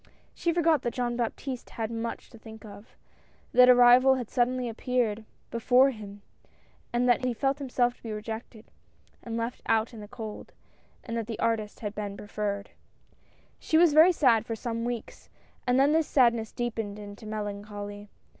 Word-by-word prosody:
She 340 Hz, -, -1 dB
forgot 330 Hz, -4 st, +2 dB
that 240 Hz, -, -3 dB
Jean 245 Hz, -2 st, -1 dB
Baptiste 245 Hz, +2 st, -4 dB
had 225 Hz, -1 st, -4 dB
much 230 Hz, 0 st, -5 dB
to 230 Hz, -, -14 dB
think 220 Hz, 0 st, -12 dB
of 205 Hz, +1 st, -13 dB, 0.3 s
— -, -, -34 dB
that 250 Hz, 0 st, +7 dB
a 250 Hz, -, +9 dB
rival 245 Hz, +2 st, +7 dB
had 245 Hz, -4 st, -5 dB
suddenly 250 Hz, 0 st, +1 dB
appeared 230 Hz, -2 st, -1 dB, 0.3 s
before 250 Hz, +3 st, +4 dB
him 205 Hz, -3 st, -10 dB, 0.3 s
— -, -, -35 dB
and 240 Hz, +1 st, +1 dB
that 245 Hz, +1 st, +3 dB
he 250 Hz, -2 st, 0 dB
felt 270 Hz, +4 st, 0 dB
himself 250 Hz, -2 st, 0 dB
to -, -, -30 dB
be 225 Hz, -, -6 dB
rejected 220 Hz, +1 st, -7 dB, 0.5 s
and 230 Hz, -1 st, -5 dB
left 230 Hz, +2 st, -4 dB
out 225 Hz, +2 st, +1 dB
in 225 Hz, -, -9 dB
the 210 Hz, -, -9 dB
cold, 215 Hz, -1 st, -8 dB, 0.5 s
and 230 Hz, -, -5 dB
that 225 Hz, -2 st, -3 dB
the 225 Hz, -, -5 dB
artist 215 Hz, -2 st, -1 dB
had 210 Hz, -2 st, -4 dB
been 205 Hz, -1 st, -5 dB
preferred. 205 Hz, -1 st, -4 dB, 0.9 s
She 315 Hz, -, +1 dB
was 335 Hz, -2 st, +5 dB
very 320 Hz, +4 st, +7 dB
sad 245 Hz, -, +3 dB
for 230 Hz, 0 st, -4 dB
some 230 Hz, 0 st, -4 dB
weeks, 240 Hz, -2 st, -6 dB, 0.4 s
and 250 Hz, +1 st, +3 dB
then 280 Hz, +2 st, +4 dB
this 320 Hz, 0 st, +2 dB
sad 245 Hz, -4 st, +4 dB
ness 225 Hz, -2 st, -5 dB
deepened 225 Hz, -4 st, -4 dB
into 205 Hz, +1 st, -10 dB
melancholy. 205 Hz, -1 st, -6 dB
230 Hz, 185 wpm, -28 LUFS, 215-250 Hz, 0.9 s, a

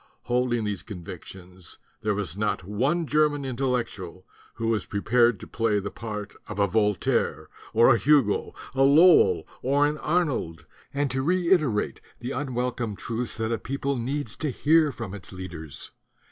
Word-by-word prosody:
Holding 120 Hz, -1 st, 0 dB
these 105 Hz, -2 st, -2 dB
convictions 90 Hz, -1 st, -10 dB, 0.2 s
there 105 Hz, -1 st, 0 dB
was 95 Hz, -5 st, -3 dB
not 105 Hz, -2 st, -1 dB
one 135 Hz, -, 0 dB
German 150 Hz, -1 st, +2 dB
Intellectual 120 Hz, -9 st, -3 dB, 0.3 s
who 115 Hz, -, -4 dB
was 110 Hz, -2 st, 0 dB
prepared 115 Hz, +1 st, +2 dB
to -, -, -9 dB
play 115 Hz, -2 st, 0 dB
the 100 Hz, -, -5 dB
part 105 Hz, -3 st, -6 dB
of -, -, -7 dB
a 100 Hz, -, +4 dB
Voltaire 105 Hz, -1 st, 0 dB, 0.2 s
or 115 Hz, +2 st, +6 dB
a 115 Hz, -, +1 dB
Hugo, 140 Hz, -8 st, +2 dB, 0.2 s
a 135 Hz, -, 0 dB
Lowell 140 Hz, -, +6 dB, 0.2 s
or 140 Hz, +3 st, +3 dB
an 150 Hz, +1 st, -1 dB
Arnold 140 Hz, -, -1 dB, 0.3 s
and 140 Hz, -1 st, -1 dB
to 130 Hz, 0 st, -1 dB
reiterate 170 Hz, -, +1 dB, 0.2 s
the 120 Hz, +2 st, -5 dB
unwelcome 125 Hz, -5 st, -2 dB
truths 115 Hz, +4 st, -4 dB
that 110 Hz, 0 st, -1 dB
a 115 Hz, -, 0 dB
people 140 Hz, +2 st, -2 dB
needs 125 Hz, -1 st, -3 dB
to 155 Hz, -, -2 dB
hear 155 Hz, +3 st, +3 dB
from 115 Hz, -6 st, -7 dB
its 105 Hz, -, -8 dB
leaders. 85 Hz, -6 st, -8 dB
115 Hz, 155 wpm, -26 LUFS, 105-140 Hz, 0.3 s, or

